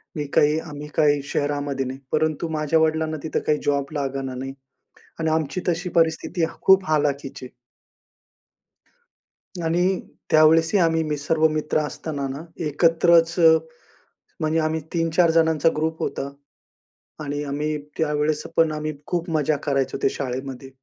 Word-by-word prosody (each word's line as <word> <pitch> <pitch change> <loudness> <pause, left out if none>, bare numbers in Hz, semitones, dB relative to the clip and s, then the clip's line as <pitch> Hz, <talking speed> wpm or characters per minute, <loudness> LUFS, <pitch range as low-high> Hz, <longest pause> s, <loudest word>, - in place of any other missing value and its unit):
मी 150 - -2
काही 150 +2 +4
आम्ही 150 -2 -8
काही 145 -2 +3
शहरामध्ये 145 -1 -2
नाही. 130 +1 -6
परंतु 155 +1 0
माझ्या 155 +1 +2
वडिलांना 160 0 +1
तिथं 160 - -1
काही 150 -1 +2
जॉब 140 +1 0
लागला 135 -2 -3
नाही 135 +1 -5 0.7
आणि 160 -1 +1
आमची 160 +2 -1
तशी 175 +2 -1
परिस्थिती 165 +1 +1 0.2
खूप 190 0 +5
ह - - 0
हलाखीची. 140 -3 -2 2.1
आणि 175 +3 +1 0.3
त्यावेळेसही 160 +4 +5
आम्ही, 165 -1 +2
मी 150 -1 -2
सर्व 155 +2 +2
मित्र 155 0 -1
असताना 150 -1 -3
ना 140 +4 -6 0.2
एकत्रच 165 +2 +4 1.1
म्हणजे 155 +1 +1
आम्ही 160 0 0
3-4 165 0 +2
जणांचा 160 -1 +3
ग्रुप 160 +1 -1
होता 140 - -3 0.9
आणि 145 0 -3
आम्ही 150 +2 -2 0.2
त्यावेळेस 150 -1 0 0.2
पण 165 -1 +4
आम्ही 155 0 -3
खूप 175 0 -2
मजा 155 -2 +1
करायचो 135 -2 0
त्या 135 - +3
शाळेमध्ये 130 0 -5
155 Hz, 135 wpm, -23 LUFS, 145-160 Hz, 2.1 s, खूप